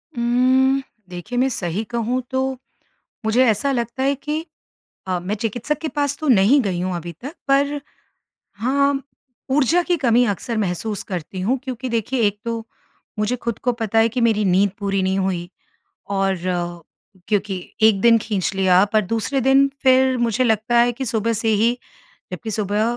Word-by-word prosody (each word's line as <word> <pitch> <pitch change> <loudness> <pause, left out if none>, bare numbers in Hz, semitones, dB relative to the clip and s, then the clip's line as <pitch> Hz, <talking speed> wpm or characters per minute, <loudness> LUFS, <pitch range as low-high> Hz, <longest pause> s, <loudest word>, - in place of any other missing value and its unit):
उम्म, 255 +3 +3 0.3
देखिए 180 +7 -6
मैं 265 +1 +3
सही 185 -2 -3
कहूँ 235 +2 -2
तो 260 0 0 0.8
मुझे 235 +4 +4
ऐसा 250 +5 +2
लगता 240 0 -2
है 275 +1 +2
कि 300 +4 -4 0.6
अ, 185 -1 -1
मैं 185 +4 -3
चिकित्सक 235 +6 -2
के 320 - -3
पास 285 -2 -1
तो 310 - -3
नहीं 240 +4 +5
गई 185 -4 -2
हूँ 185 0 -2
अभी 170 0 -6
तक 280 +6 -7
पर 285 +1 +2 0.8
हाँ, 275 +4 +1 0.5
ऊर्जा 295 +6 +3
की 350 0 0
कमी 245 -4 +3
अक्सर 220 +2 -2
महसूस 205 +1 -2
करती 185 0 -5
हूँ, 240 +8 0
क्योंकि 260 -1 -4
देखिए 235 +2 -1
एक 205 0 -1
तो 230 -1 -3 0.5
मुझे 215 +4 0
खुद 235 -2 -4
को 250 - +2
पता 225 -2 -1
है 225 - +5
कि 245 +2 -3
मेरी 220 -3 +2
नींद 195 +2 +3
पूरी 195 -1 -1
नहीं 190 +1 0
हुई 180 -2 -1 0.7
और 195 -1 +1 0.9
क्योंकि 205 -2 0 0.3
एक 215 -3 +5
दिन 230 +1 +6
खींच 200 -5 -1
लिया 190 0 +4
पर 215 - +4
दूसरे 230 +6 -1
दिन 270 +2 +4
फिर 260 -1 +4
मुझे 240 +1 +1
लगता 225 +1 +2
है 240 +1 +4
कि 265 +3 -5
सुबह 225 -1 0
से 225 0 -1
ही 225 +3 +2 0.5
जबकि 225 - -5
सुबह 210 0 0
230 Hz, 170 wpm, -21 LUFS, 205-260 Hz, 0.9 s, दिन